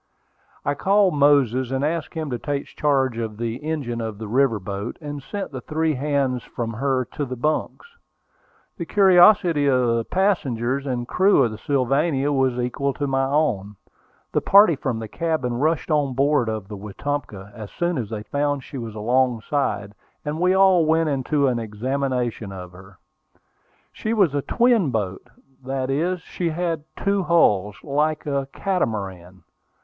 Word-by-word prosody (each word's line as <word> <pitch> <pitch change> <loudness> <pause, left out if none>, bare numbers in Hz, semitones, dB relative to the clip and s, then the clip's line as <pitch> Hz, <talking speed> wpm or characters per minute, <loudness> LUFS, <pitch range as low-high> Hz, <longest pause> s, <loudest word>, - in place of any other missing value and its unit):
I 145 - +1
called 195 +4 +3
Moses, 140 -4 +3
and 135 +2 -1
asked 160 +1 -3
him 155 -3 -3
to 120 - -2
take 140 +1 -3
charge 135 -5 0
of 110 -2 -4
the 115 0 -3
engine 140 -6 -3
of 110 -2 -5
the 110 0 -7
river 120 -1 +2
boat, 100 +3 -5
and 145 -2 -6
sent 200 +6 -5
the 130 -2 -6
three 155 +4 0
hands 135 -2 0
from 115 -1 -5
her 130 +2 0
to 150 - -3
their 130 -2 -4
bunks. 150 - -2 0.9
The 170 - -4
curiosity 180 -5 +5
of 130 -2 +3
the 115 - -1
passengers 140 - 0
and 120 -2 -2
crew 190 -4 +4
of 115 - 0
the 110 - -8
Sylvania 140 +2 +1
was 130 -3 +1
equal 135 +3 -1
to 145 - -2
my 135 -1 +1
own. 125 -9 0 0.6
The - - +1
party 200 -4 +6
from 130 -4 -3
the 110 0 -5
cabin 155 -2 -2
rushed 155 +6 0
on 145 -4 +1
board 140 -3 +2
of 110 -3 -4
the 105 -1 -7
Wetumpka 105 -1 -5
as 110 -4 -8
soon 175 -3 -1
as 110 -4 -4
they 110 -2 -5
found 145 +3 -1
she 135 - -8
was 115 -2 -7
alongside, 120 -2 0 0.3
and 150 +2 -3
we 180 +2 +3
all 190 -3 +5
went 160 0 +2
into 140 +1 0
an 125 -3 +1
examination 120 0 -2
of 90 -2 -8
her. 95 +1 -15 1.0
She 220 +1 -2
was 190 -9 +3
a 145 - 0
"twin 235 - +2
boat:" 105 -1 -3 0.3
that 135 0 -2
is, 175 +5 0
she 175 -2 -3
had 165 -2 -2
two 200 0 +1
hulls, 105 - +2
like 150 +2 0
a 140 -2 -1
"catamaran." 95 - -3
135 Hz, 165 wpm, -23 LUFS, 115-155 Hz, 1.0 s, party